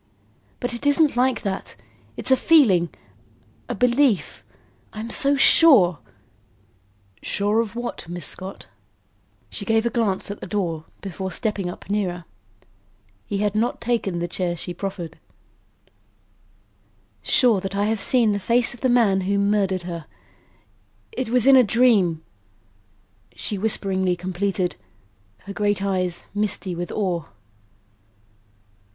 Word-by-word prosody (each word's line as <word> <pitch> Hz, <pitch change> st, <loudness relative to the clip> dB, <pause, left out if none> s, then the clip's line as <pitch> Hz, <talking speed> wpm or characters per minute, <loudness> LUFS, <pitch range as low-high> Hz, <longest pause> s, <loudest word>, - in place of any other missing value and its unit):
But 245 Hz, -1 st, -3 dB
it 240 Hz, +4 st, -3 dB
isn't 285 Hz, 0 st, +3 dB
like 255 Hz, +1 st, +1 dB
that. 195 Hz, -2 st, -4 dB, 0.4 s
It's -, -, 0 dB
a -, -, +8 dB
feeling 225 Hz, -, +4 dB, 0.8 s
a -, -, -2 dB
belief. 250 Hz, -3 st, +1 dB, 0.5 s
I'm 220 Hz, +2 st, -6 dB
so 280 Hz, +1 st, +2 dB
sure 260 Hz, -, +5 dB, 0.6 s
" 100 Hz, 0 st, -37 dB
"Sure 205 Hz, +2 st, 0 dB
of 230 Hz, -1 st, -2 dB
what, 240 Hz, -7 st, -6 dB
Miss 175 Hz, -3 st, -4 dB
Scott?" 190 Hz, +5 st, -4 dB, 0.9 s
She 205 Hz, -, -5 dB
gave 225 Hz, +2 st, +1 dB
a 235 Hz, -, 0 dB
glance 205 Hz, -5 st, -1 dB
at 205 Hz, -, -8 dB
the -, -, -6 dB
door 170 Hz, -6 st, -3 dB, 0.2 s
before 190 Hz, 0 st, -5 dB
stepping 200 Hz, 0 st, -2 dB
up -, -, -10 dB
nearer. 185 Hz, -4 st, -2 dB, 1.0 s
He 200 Hz, -, -2 dB
had 205 Hz, -, 0 dB
not 225 Hz, +3 st, -1 dB
taken 230 Hz, -7 st, -1 dB
the 170 Hz, 0 st, -2 dB
chair 175 Hz, 0 st, -2 dB
she 175 Hz, -, -5 dB
preferred. 175 Hz, -3 st, -6 dB, 2.0 s
"Sure 230 Hz, -7 st, +3 dB
that 195 Hz, +1 st, -5 dB
I 200 Hz, +1 st, +1 dB
have 220 Hz, -1 st, -1 dB
seen 235 Hz, -2 st, +3 dB
the 205 Hz, -, -1 dB
face 235 Hz, +6 st, +2 dB
of 240 Hz, -, -14 dB
the 260 Hz, -, +2 dB
man 220 Hz, -6 st, +3 dB
who 200 Hz, +2 st, 0 dB
murdered 200 Hz, -2 st, +1 dB
her. 170 Hz, -3 st, -7 dB, 1.0 s
It 260 Hz, -, -4 dB
was 245 Hz, -1 st, +3 dB
in 270 Hz, 0 st, +7 dB
a 260 Hz, -, +8 dB
dream," 205 Hz, -8 st, +2 dB, 1.1 s
she 210 Hz, -, -3 dB
whisperingly 190 Hz, -3 st, 0 dB
completed, 185 Hz, +1 st, -2 dB, 0.6 s
her 200 Hz, -, -8 dB
great 205 Hz, -1 st, 0 dB
eyes 185 Hz, -3 st, -1 dB
misty 205 Hz, -2 st, -2 dB
with 175 Hz, +1 st, -5 dB
awe. 180 Hz, -6 st, -2 dB
200 Hz, 135 wpm, -22 LUFS, 180-230 Hz, 2.0 s, a